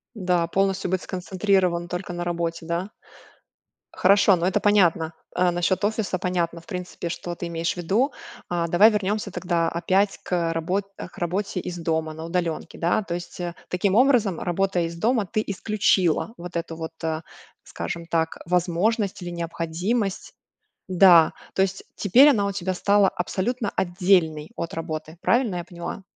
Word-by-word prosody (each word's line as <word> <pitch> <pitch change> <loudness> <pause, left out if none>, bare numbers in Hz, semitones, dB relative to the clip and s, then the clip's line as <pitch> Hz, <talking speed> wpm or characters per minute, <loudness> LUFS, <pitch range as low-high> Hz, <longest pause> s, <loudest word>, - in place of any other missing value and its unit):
Да, 180 -4 +1
полностью 195 +1 0
быть 185 0 0
сконцентрирован 185 -2 0
только 180 0 -4
на 175 0 -4
работе, 170 -1 -2
да. 170 +4 -2 1.0
Хорошо, 200 0 +5
но 175 +1 -1
это 190 - +1
понятно. 175 -6 +3 0.2
Э, 180 0 +3
насчёт 175 +2 0
офиса 205 -3 0
понятно, 170 -2 -1
в 165 - -21
принципе, 180 -2 -5
что 175 0 -5
ты 175 - -6
имеешь 165 0 -1
в - - -20
виду. 210 - +1 0.4
А, 170 -1 -1
давай 200 +7 +6
вернёмся 210 0 -1
тогда 170 -3 0
опять 190 +4 +1
к, - - -11 0.2
э, - - -1
работ 180 +5 -1
к - - -9
работе 185 +2 -2
из 175 0 -5
дома 160 -1 -1
на 160 +1 -8
удалёнке. 170 -1 -3
Да, 175 +5 +1
то 175 -4 -4
есть, 175 +1 -7
э, 175 -1 -3
таким 185 +2 0
образом, 230 - +3
работая 180 0 0
из 165 0 -5
дома, 225 +4 +1
ты 215 +4 -1
исключила 200 -1 +1
вот 175 0 -8
эту 165 -1 -3
вот, 160 0 -6
э, 160 0 -2 0.4
скажем 170 0 -5
так, 165 -1 -1
возможность 180 +4 0
или 175 - -5
необходимость. 175 +5 -2 0.5
Да, 180 -3 +6 0.2
то 190 - +1
есть 195 0 -1
теперь 250 +9 +6
она 210 -7 +2
у - - -1
тебя 190 -1 -2
стала 200 +2 +3
абсолютно 205 +5 -2
отдельной 175 -4 +1
от 170 - -4
работы, 160 0 -5
правильно 235 -5 +2
я 175 - -4
поняла? 175 +2 -7
180 Hz, 165 wpm, -24 LUFS, 170-195 Hz, 1.0 s, давай